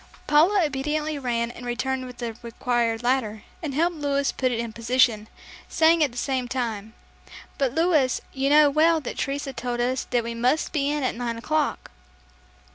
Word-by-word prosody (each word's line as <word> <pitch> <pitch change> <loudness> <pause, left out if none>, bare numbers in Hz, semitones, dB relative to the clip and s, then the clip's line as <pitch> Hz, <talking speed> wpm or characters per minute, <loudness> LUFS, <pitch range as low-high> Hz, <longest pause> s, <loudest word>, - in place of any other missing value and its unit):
Paula 340 +5 +4
obediently 300 +2 -2
ran 235 -3 -1
and 245 - -11
returned 255 +2 -2
with 250 -1 -11
the 235 -2 -5
required 235 -1 -1
ladder, 240 -4 0 0.2
and 295 -5 -4
helped 335 +2 +1
Louis 280 -1 0
put 255 -1 -1
it 235 - -1
in 230 -1 -4
position, 230 -2 +2 0.4
saying 325 0 +4
at 285 - +1
the 240 - -12
same 260 -1 -1
time, 230 -4 -4 0.6
"But 270 -2 0
Louis, 320 -6 +2
you 270 0 0
know 300 +1 +7
well 320 +2 +4
that 300 - -6
Teresa 275 0 -3
told 245 -1 -4
us 250 +2 0
that 240 -2 +1
we 235 0 -4
must 250 +6 0
be 280 -2 +1
in 295 -1 -1
at 255 - 0
nine 235 0 -3
o'clock." 305 - -1
260 Hz, 180 wpm, -24 LUFS, 240-295 Hz, 0.6 s, know